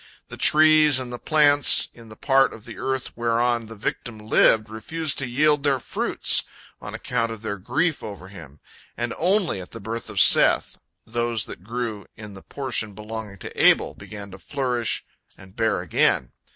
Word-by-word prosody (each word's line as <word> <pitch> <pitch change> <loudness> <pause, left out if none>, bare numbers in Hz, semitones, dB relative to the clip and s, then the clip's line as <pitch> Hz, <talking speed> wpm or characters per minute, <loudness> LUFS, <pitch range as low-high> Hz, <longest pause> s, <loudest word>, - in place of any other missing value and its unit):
The - - -9
trees 155 -2 +6
and 125 -2 -4
the 120 - -7
plants 145 -2 +5
in 115 -2 -16
the 110 - -12
part 135 +3 +2
of 110 - -13
the 115 - -11
earth 130 -1 -4
whereon 120 0 -1
the 115 - -11
victim 110 +1 -5
lived 110 0 +2
refused 140 +8 -3
to 135 - -2
yield 150 +4 +1
their 140 -2 +1
fruits, 125 - +1 0.4
on - - -7
account 115 0 -2
of 110 -1 -9
their 100 -2 -5
grief 145 - -1
over 100 -3 -9
him, 80 -7 -14 0.4
and 120 0 -3
only 180 - 0
at 90 - -13
the 115 - -8
birth 110 +2 -7
of 105 -3 -2
Seth - - +5 0.3
those 120 -2 -1
that 85 - -11
grew 115 -1 -5
in 105 -2 -11
the 95 - -12
portion 120 -7 -4
belonging 105 -1 -8
to - - -5
Abel - - +4
began 100 -1 -11
to 95 - -12
flourish 125 -3 -2 0.3
and 95 +1 -16
bear 110 -5 -1
again. 90 - 0
115 Hz, 180 wpm, -22 LUFS, 105-135 Hz, 0.4 s, trees